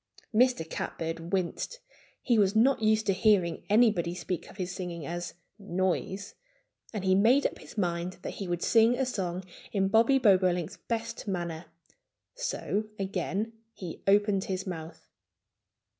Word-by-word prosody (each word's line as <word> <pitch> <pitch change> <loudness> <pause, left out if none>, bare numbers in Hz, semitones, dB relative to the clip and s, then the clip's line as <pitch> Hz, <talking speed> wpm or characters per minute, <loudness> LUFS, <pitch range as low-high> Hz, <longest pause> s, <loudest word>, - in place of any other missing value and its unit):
Mr. 240 -7 +3
Catbird 165 +1 -4
winced. 190 - -1 0.5
He 235 -4 +3
was 200 0 +3
not 245 +3 +4
used 215 0 +3
to 195 - +3
hearing 185 -4 +3
anybody 205 -6 +3
speak 180 -1 -4
of - - -14
his 180 -2 -3
singing 175 -4 -5
as 175 +2 -5 0.2
"noise." 190 +1 -2 0.6
And 210 -4 -4
he 190 - +4
made 235 +9 +4
up - - -1
his - - -13
mind 175 -1 -1
that - - -4
he 195 - -3
would 175 -1 -2
sing 230 +1 +5
a 265 - +1
song 185 -7 -3 0.3
in 195 -2 +1
Bobby 230 +6 +5
Bobolink's 185 -6 +3
best 230 -1 -4
manner. 170 -3 -3 0.7
So 470 - -2
again 195 +3 -2 0.2
he 175 -4 -7
opened 200 -1 +3
his 190 0 -3
mouth. 165 -3 -7
190 Hz, 145 wpm, -29 LUFS, 175-220 Hz, 0.7 s, sing